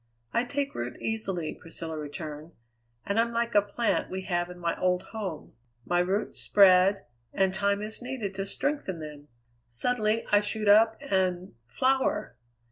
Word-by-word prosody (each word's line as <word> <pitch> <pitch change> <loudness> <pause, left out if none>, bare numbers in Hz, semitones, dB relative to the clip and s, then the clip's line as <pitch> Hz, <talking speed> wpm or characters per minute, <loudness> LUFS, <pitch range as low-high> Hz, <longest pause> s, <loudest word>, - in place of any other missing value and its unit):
"I 235 - +2
take 280 +2 -2
root 120 +1 -5
easily," 195 -8 -2
Priscilla 165 -1 -7
returned, 150 +1 -7 0.5
"and 200 +3 0
I'm 235 +1 +2
like 235 0 -1
a 205 - +6
plant 205 +4 -1
we 190 0 -4
have 175 -1 -1
in 180 - -9
my 170 -1 -1
old 180 0 +2
home. 195 -8 -5 0.3
My 175 0 +1
roots 190 +4 -1
spread, 195 0 +5 0.3
and 190 -1 +1
time 200 +1 0
is 215 +3 -6
needed 245 -6 -4
to 195 +1 -4
strengthen 280 - -2
them; 150 -1 -9 0.4
suddenly 215 - +1
I 205 0 +6
shoot 215 0 -2
up 220 +2 +6
and 185 -7 0
flower. 260 - 0
195 Hz, 155 wpm, -28 LUFS, 175-225 Hz, 0.5 s, a